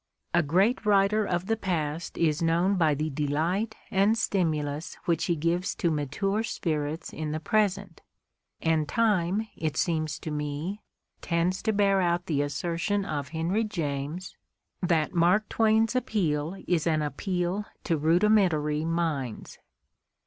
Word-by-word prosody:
A 175 - +5
great 190 - +2
writer 210 0 +3
of 175 0 -1
the 225 - +1
past 165 -6 -3
is 155 -2 +1
known 170 +4 +2
by 160 -5 +3
the 155 +2 -2
delight 160 +10 -1 0.2
and 200 +3 +3
stimulus 155 -6 -1
which 170 -3 +1
he 170 - +1
gives 170 +4 -1
to 170 - 0
mature 160 +8 -1
spirits 155 -7 -3
in 155 -1 -4
the 155 - -2
present, 200 0 0 0.6
and 160 -2 +1
time, 210 -2 +1
it 155 -3 -3
seems 155 -3 0
to 155 - -5
me, 150 +7 -3 0.4
tends 170 +2 0
to 220 - +1
bear 200 -2 +3
out 175 0 +1
the 145 -4 0
assertion 170 +8 -1
of 145 -5 -3
Henry 165 +8 0
James 160 -3 -4 0.5
that 170 -3 +1
Mark 180 +5 +3
Twain's 225 +1 +2
appeal 180 -9 0
is 170 -2 +1
an 155 -2 +2
appeal 180 +6 -2 0.2
to 165 - +1
rudimentary 160 -2 +3
minds. 160 -8 -2
170 Hz, 140 wpm, -27 LUFS, 155-195 Hz, 0.6 s, A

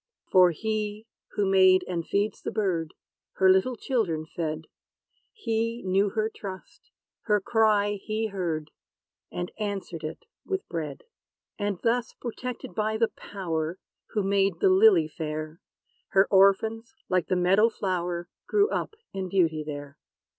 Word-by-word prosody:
For 185 -1 +7
He, 215 +3 -3 0.3
who 205 - +1
made, 185 -1 +5
and 175 -2 -2
feeds 200 +5 -1
the - - -3
bird, 180 -7 -1 0.4
Her 190 0 +5
little 190 +7 +2
children 205 - -1
fed. 155 -1 -4 0.7
He 230 - -2
knew 195 +2 +2
her 215 +2 0
trust: 215 - -9 0.4
her 210 -2 +3
cry 205 -1 +2
he 215 +1 -1
heard; 170 -7 -3 0.6
And 175 +1 -4
answered 195 -6 -4
it 155 +1 -6 0.2
with 385 -1 -3
bread. 155 -5 -5 0.6
And 205 -3 -1
thus, 235 +1 +1
protected 245 -3 -6
by 215 +3 0
the 230 0 +2
Power, 165 -4 -4 0.3
Who 210 - -1
made 195 -3 +1
the 190 - +4
lily 190 -4 +6
fair, 155 +1 -5 0.5
Her 195 0 +4
orphans, 220 +6 +3
like 185 -3 +1
the 185 - +1
meadow 190 +5 +4
flower, 180 -5 -2 0.2
Grew 415 0 +3
up - - -2 0.2
in 190 -1 -3
beauty 165 -5 +2
there. 145 -1 -7
195 Hz, 140 wpm, -27 LUFS, 170-220 Hz, 0.7 s, For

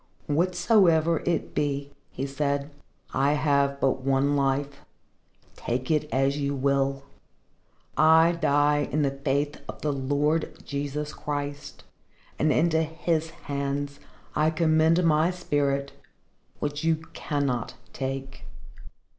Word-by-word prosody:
"Whatsoever 170 0 +3
it 170 -2 -1
be," 140 -1 -1 0.2
he 135 - -4
said, 140 +1 -2 0.4
"I 140 +2 +2
have 140 -1 +1
but 135 -1 +1
one 135 +2 +2
life. 140 0 -1 0.7
Take 125 +4 -3
it 150 -1 0
as 135 +2 +1
you 140 0 -1
will. 135 0 0 0.9
I 160 +2 +6
die 145 -3 +2
in 150 +2 +1
the 140 - +1
faith 140 +1 -2
of - - -8
the 150 -1 +1
Lord 145 +4 0
Jesus 145 +1 -3
Christ, 145 -1 -5 0.6
and 155 +1 +3
into 160 +4 +3
His 160 0 -1
hands 140 -2 -4 0.4
I 155 +1 +3
commend 160 +1 +3
my 160 0 +3
spirit 140 -6 -1 0.7
which 145 +1 -3
you 165 0 +3 0.2
cannot 140 -6 -2 0.2
take." 135 0 -5
145 Hz, 115 wpm, -26 LUFS, 140-155 Hz, 0.9 s, I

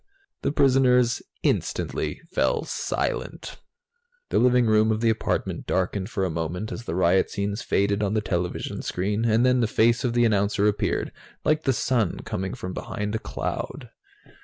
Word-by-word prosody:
The - - 0
prisoners 125 -3 +3 0.2
instantly - - -1
fell - - +1
silent. - - -3 0.7
The - - +2
living 125 0 +4
room 110 0 +4
of 110 - 0
the 115 -1 +4
apartment 110 - -2
darkened 95 +2 -1
for 100 -5 -1
a - - -1
moment 85 +6 -3
as 120 - -6
the 85 - -3
riot 90 +1 +3
scenes 100 +2 -2
faded 100 +1 +1
on 105 +1 0
the - - +3
television 90 -3 -3
screen, 105 +5 -1
and 115 +2 +3
then 125 0 +4
the 115 - +2
face 115 +2 +3
of 125 -2 0
the 120 0 +3
announcer 100 -1 +2
appeared, 105 -1 0 0.3
like 155 +1 +2
the 135 - +4 0.2
Sun 115 -8 +1
coming 95 0 -4
from 90 0 -6
behind 105 +3 -4
a 110 - -1
cloud. - - -5
110 Hz, 165 wpm, -25 LUFS, 95-120 Hz, 0.7 s, living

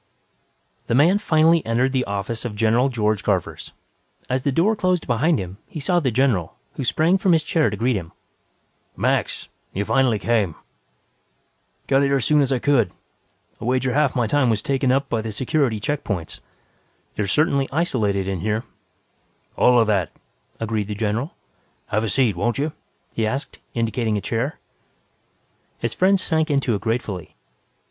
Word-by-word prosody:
_ - - -40
The 115 - +1
man 170 +9 +4
finally 160 -2 +3
entered 120 +4 +1
the 130 -1 +1
office 100 +3 -3
of 120 -4 -5
General 115 +5 +2
George 110 -4 0
Garvers. - - -2 0.6
As 130 +1 +1
the 140 - 0
door 185 +11 +2
closed 185 -4 0
behind 140 +7 +2
him, 95 0 -6
he 155 - -7
saw 175 +5 +2
the 140 -6 0
general, 115 -9 +1 0.2
who - - -4
sprang 165 +9 +2
from 185 -1 +3
his 160 -1 +3
chair 155 -3 +2
to 105 - -5
greet 120 +3 +1
him. 85 -4 -5 0.9
"Max! - - 0 0.3
You 100 +2 -2
finally 130 -3 +2
came." 105 -6 0 1.3
"Got 135 0 +3
here 140 0 +2
as 130 -5 +1
soon 150 -1 +4
as 135 -1 +1
I 130 - +2
could. 125 -3 +2 0.7
I - - -5
wager 130 0 +1
half 150 -2 +2
my 120 -2 +2
time 130 +2 +2
was 110 -2 +1
taken 135 -2 +1
up 135 +1 +1
by 115 -3 -1
the 110 0 -5
security 130 0 0
check 145 +7 -2
points. 90 -6 -4 0.7
You 105 - -1
are - - -5
certainly 140 - +2
isolated 110 - 0
in 95 -2 -2
here." 110 +5 -1 0.9
"All 125 -1 +5
of 115 - +4
that," 100 -7 +1 0.5
agreed 110 -2 -2
the 105 - -4
general. 110 +7 -2 0.5
"Have 110 +1 0
a 110 - -1
seat, 115 -2 +2
won't 115 +6 -1
you?" 150 +3 -1 0.4
he 110 -1 0
asked, 135 +6 -4 0.2
indicating 115 -1 0
a - - -3
chair. 120 +9 -2 1.2
His 115 -1 -2
friend 190 +1 +3
sank 160 -3 0
into 140 -4 +1
it 100 - -2
gratefully. 110 -5 -3
125 Hz, 175 wpm, -22 LUFS, 110-145 Hz, 1.3 s, All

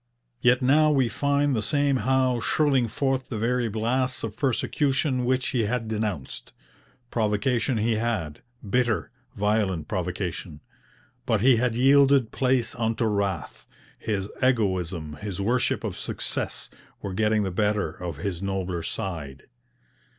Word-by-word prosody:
Yet 125 +1 +4
now 155 +4 +5
we 135 -5 +2
find 140 +1 +1
the 110 - 0
same 140 +4 +2
Howe 130 +1 +2
shrilling 135 -1 +2
forth 135 +3 -1
the 115 - -3
very 120 +1 0
blasts 125 +4 0
of 110 -2 -4
persecution 135 +1 0
which 130 +1 +1
he 120 -4 0
had 115 +1 -2
denounced. 105 -10 -4 0.6
Provocation 115 +3 +1
he 110 +1 +1
had 105 -10 -2 0.3
bitter, 120 +1 0 0.2
violent 100 -6 0
provocation. 90 -3 -4 0.7
But 110 -4 +2
he 125 0 +5
had 120 0 +1
yielded 135 -1 +5
place 130 -3 +1
unto 115 0 -1
wrath; 100 -7 -2 0.3
his 100 -3 -2
egoism, 95 - 0
his 100 +2 -6
worship 120 +5 +1
of - - -4
success, - - -3 0.3
were 100 - -4
getting 105 +1 +2
the 95 - -2
better 105 -2 0
of 85 -3 -6
his 90 +2 -4
nobler 95 -3 -2
side. 80 -5 -5
110 Hz, 135 wpm, -25 LUFS, 95-130 Hz, 0.7 s, now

